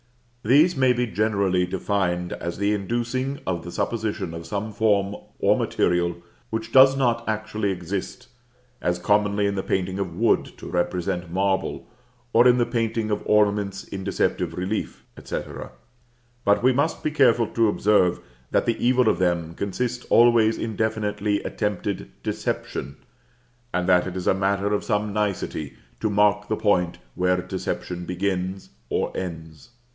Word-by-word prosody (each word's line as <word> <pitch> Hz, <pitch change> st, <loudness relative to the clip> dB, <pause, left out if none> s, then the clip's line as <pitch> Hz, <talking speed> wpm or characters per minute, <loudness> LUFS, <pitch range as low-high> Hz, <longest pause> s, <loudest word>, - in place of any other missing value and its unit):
These 150 Hz, +10 st, +5 dB
may 130 Hz, -1 st, +4 dB
be 125 Hz, 0 st, 0 dB
generally 100 Hz, -5 st, +1 dB
defined 90 Hz, -2 st, -1 dB
as 85 Hz, 0 st, -5 dB
the 100 Hz, +2 st, +1 dB
inducing 120 Hz, +6 st, -2 dB
the 85 Hz, -2 st, -3 dB
supposition 105 Hz, -4 st, -2 dB
of 85 Hz, 0 st, -7 dB
some 105 Hz, +1 st, -3 dB
form 105 Hz, -2 st, +2 dB, 0.2 s
or -, -, +3 dB
material 85 Hz, 0 st, 0 dB, 0.3 s
which 110 Hz, 0 st, -4 dB
does 135 Hz, +1 st, +7 dB
not 120 Hz, -3 st, +1 dB
actually 110 Hz, -1 st, -2 dB
exist; 95 Hz, +7 st, -4 dB, 0.5 s
as 90 Hz, 0 st, 0 dB
commonly 105 Hz, +2 st, +2 dB
in 100 Hz, -, +1 dB
the 95 Hz, -, -1 dB
painting 95 Hz, 0 st, -1 dB
of 90 Hz, -4 st, -3 dB
wood -, -, +2 dB
to -, -, -11 dB
represent 90 Hz, 0 st, -2 dB
marble, 95 Hz, +2 st, -1 dB, 0.5 s
or 120 Hz, +2 st, +6 dB
in 125 Hz, 0 st, +5 dB
the 120 Hz, -, +3 dB
painting 115 Hz, -2 st, -1 dB
of 105 Hz, -, 0 dB
ornaments 100 Hz, -2 st, +2 dB
in 95 Hz, -1 st, -7 dB
deceptive 100 Hz, -, -1 dB
relief, 95 Hz, +4 st, -3 dB, 0.2 s
&c. -, -, -3 dB, 1.0 s
But 100 Hz, +3 st, +3 dB
we 130 Hz, +1 st, +5 dB
must 145 Hz, +5 st, 0 dB
be 155 Hz, -, 0 dB
careful 125 Hz, -6 st, +4 dB
to 115 Hz, -1 st, +2 dB
observe, 100 Hz, -3 st, +3 dB, 0.3 s
that -, -, +1 dB
the 115 Hz, -, -1 dB
evil 125 Hz, 0 st, +4 dB
of 95 Hz, -, +2 dB
them 85 Hz, -2 st, 0 dB
consists 120 Hz, +7 st, -3 dB
always 115 Hz, -2 st, +5 dB
in 110 Hz, -1 st, -4 dB
definitely 105 Hz, -1 st, -1 dB
attempted 105 Hz, -1 st, -3 dB
deception, 70 Hz, +2 st, -3 dB, 0.7 s
and 90 Hz, 0 st, -1 dB
that 90 Hz, -1 st, +4 dB
it 95 Hz, 0 st, -5 dB
is 90 Hz, -, -4 dB
a -, -, +4 dB
matter 100 Hz, +1 st, 0 dB
of 105 Hz, -, 0 dB
some 105 Hz, 0 st, -1 dB
nicety 100 Hz, -8 st, -2 dB, 0.3 s
to 110 Hz, -, 0 dB
mark 105 Hz, 0 st, +2 dB
the 110 Hz, -, -1 dB
point 90 Hz, -5 st, +1 dB, 0.2 s
where 90 Hz, 0 st, +1 dB
deception 90 Hz, 0 st, -4 dB
begins 95 Hz, +1 st, -3 dB, 0.2 s
or -, -, -1 dB
ends. 80 Hz, +1 st, -7 dB
100 Hz, 150 wpm, -24 LUFS, 90-110 Hz, 1.0 s, does